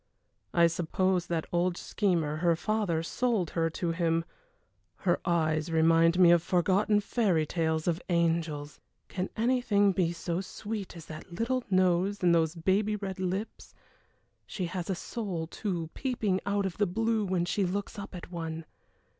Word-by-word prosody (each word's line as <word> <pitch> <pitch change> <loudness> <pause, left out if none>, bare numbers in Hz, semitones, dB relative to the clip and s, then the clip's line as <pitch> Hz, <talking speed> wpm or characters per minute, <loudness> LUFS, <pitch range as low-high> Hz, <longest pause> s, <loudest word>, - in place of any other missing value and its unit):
I 170 -1 +5
suppose 180 +2 0
that 165 -2 -1
old 175 0 +1
schemer, 170 -7 0
her 170 0 +2
father, 190 -3 -1
sold 220 -2 0
her 165 -1 +1
to 170 +1 -2
him. 165 -1 0 0.7
Her 175 -2 0
eyes 160 -1 +1
remind 165 +1 +4
one 180 -2 +7
of 175 -1 +5
forgotten 190 +5 +2
fairy 195 -8 +1
tales 160 0 -1
of 170 0 0
angels. 165 -4 0 0.3
Can 185 0 -3
anything 225 -4 +3
be 175 -2 +1
so 170 +1 -3
sweet 205 -2 -6
as 165 - -10
that 155 +3 -10
little 235 +8 -1
nose 185 +1 +2
and 175 -1 +5
those 165 0 +2
baby 195 +5 +1
red 195 -2 -5
lips. 190 +4 -4 0.7
She 185 - -3
has 175 +1 -4
a 190 - 0
soul, 185 -5 -4
too, 170 -2 -4
peeping 220 -8 -1
out 200 0 +1
of 185 -3 -4
the 205 - +3
blue 225 +3 0
when 185 -3 0
she 195 +3 0
looks 195 +3 -3
up 200 -1 -8
at 175 0 -9
one. 165 -2 -5
180 Hz, 160 wpm, -29 LUFS, 165-200 Hz, 0.7 s, one